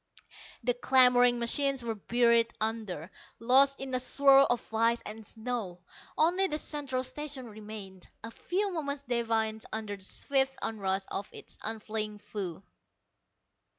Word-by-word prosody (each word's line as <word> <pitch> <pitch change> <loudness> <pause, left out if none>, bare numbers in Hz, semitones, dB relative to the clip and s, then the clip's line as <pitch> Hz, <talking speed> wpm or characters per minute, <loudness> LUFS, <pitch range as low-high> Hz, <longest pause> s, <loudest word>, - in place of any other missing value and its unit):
The 245 +1 +2
clamoring 245 -1 +5
machines 270 +2 +2
were 230 -1 -2
buried 235 +2 +2
under, 215 -6 -3 0.3
lost 270 +4 +4
in 270 -1 -6
a 255 - +2
swirl 275 +1 +5
of 240 -2 -2
ice 230 +1 +2
and 220 +1 -8
snow. 220 -6 -5 0.3
Only 360 +5 +3
the 300 - -2
Central 280 -4 -2
Station 270 0 -5
remained, 210 -4 -10 0.2
a 225 - -7
few 390 - -2
moments 285 -4 -3
defiant 225 -3 -1
under 215 -2 -4
the 195 - -11
swift 270 +6 0
onrush 195 -3 -1
of 200 - -4
its - - -11
unfeeling 215 -1 -4
foe. 200 -4 -6
235 Hz, 135 wpm, -30 LUFS, 215-270 Hz, 0.3 s, clamoring